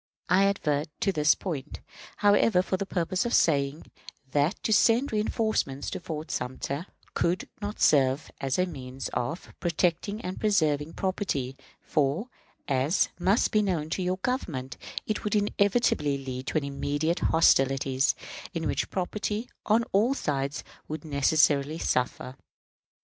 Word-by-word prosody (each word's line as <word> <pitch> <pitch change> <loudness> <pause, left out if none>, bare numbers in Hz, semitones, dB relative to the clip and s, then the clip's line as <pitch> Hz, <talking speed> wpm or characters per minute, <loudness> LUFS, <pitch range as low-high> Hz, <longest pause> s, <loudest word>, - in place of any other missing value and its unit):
I 190 +3 +5
advert 155 -7 0
to 195 - +2
this 150 -4 +4
point, 150 -6 -5 0.4
however, 205 -2 +4
for 190 - -1
the 195 +1 -3
purpose 180 0 0
of 240 - +1
saying 140 -1 +1 0.4
that 145 +7 +2
to 220 - +2
send 235 +6 +4
reënforcements 215 -10 -1
to - - -4
Fort 160 -2 -6
Sumter 140 +6 -3 0.3
could 175 +2 0
not 205 +1 -4
serve 135 0 +3
as 135 -1 0
a 180 - +3
means 135 -6 -6
of 150 +9 -3
protecting 175 +4 0
and 185 +1 -5
preserving 160 -7 +1
property, 185 -9 -2 0.3
for, 155 - 0 0.4
as 140 +5 +2
must 200 +6 +2
be 215 - +3
known 170 -6 -1
to 190 - -1
your 185 +1 0
Government, 170 - -3 0.3
it 215 - -2
would 210 - 0
inevitably 205 - +2
lead 130 -1 -6
to - - 0
immediate 145 +3 -1
hostilities, 135 -3 +3 0.4
in 165 - -2
which - - -1
property 210 +4 -2 0.2
on 220 +2 +4
all 225 +8 +3
sides 140 - -2 0.2
would 155 0 -6
necessarily 145 0 +2
suffer. 130 -2 -1
160 Hz, 140 wpm, -27 LUFS, 140-200 Hz, 0.4 s, I